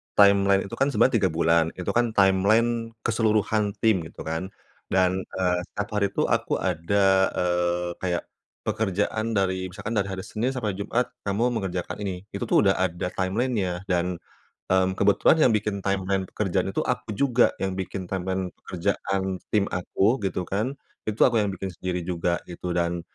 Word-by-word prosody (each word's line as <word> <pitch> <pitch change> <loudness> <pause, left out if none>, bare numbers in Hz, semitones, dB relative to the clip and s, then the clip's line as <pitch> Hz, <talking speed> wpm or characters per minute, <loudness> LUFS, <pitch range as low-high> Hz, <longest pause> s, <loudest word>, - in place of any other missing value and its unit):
timeline 100 -1 +5
itu - - -6
kan 135 - +3
sebenarnya 125 -3 +4
3 95 -3 +2
bulan 80 0 +3
itu 90 - -4
kan 120 -2 +1
timeline 110 +4 +3
keseluruhan 110 -2 +1
tim 95 -7 +3
gitu - - -10
kan, 80 +4 -3 0.5
dan, 95 0 +3
eee, 90 -1 +1
1 100 +1 -4
hari 100 - +3
itu - - 0
aku - - +1
ada, 95 +3 +1 0.3
eee, 90 0 0
kayak, 90 -2 -1 0.4
pekerjaan 110 +2 -1
dari 95 -1 0
misalkan 105 +5 -5
dari 100 -2 0
hari 95 -1 -5
Senin 115 +4 -1
sampai 115 -7 -2
Jumat 110 +5 -1 0.2
kamu 115 +5 0
mengerjakan 95 -2 -3
ini 95 -1 -4
itu 100 - -4
tuh - - +4
udah 95 - +5
ada 90 0 -1
timeline-nya 95 -2 -1
dan, 90 0 +1 0.6
mmm, 95 0 +3
kebetulan 100 +10 +4
yang - - +2
bikin 105 -1 -1
timeline 95 -1 -1
pekerjaan 95 -2 -1
itu - - -1
aku 125 -3 -2
juga 125 -3 +3
yang 95 -1 -1
bikin 95 0 -4
timeline 95 -1 -2
pekerjaan 95 +1 -1
tim 105 -2 +3
aku 95 +6 +1
gitu 90 -1 -2
kan, 110 +8 -1 0.3
itu 110 - -3
aku 120 -3 +4
yang 105 - +1
bikin 95 0 -5
sendiri 90 +1 -3
juga 85 -1 0
gitu 90 0 -4
dan, 85 0 0
95 Hz, 165 wpm, -25 LUFS, 90-105 Hz, 0.6 s, timeline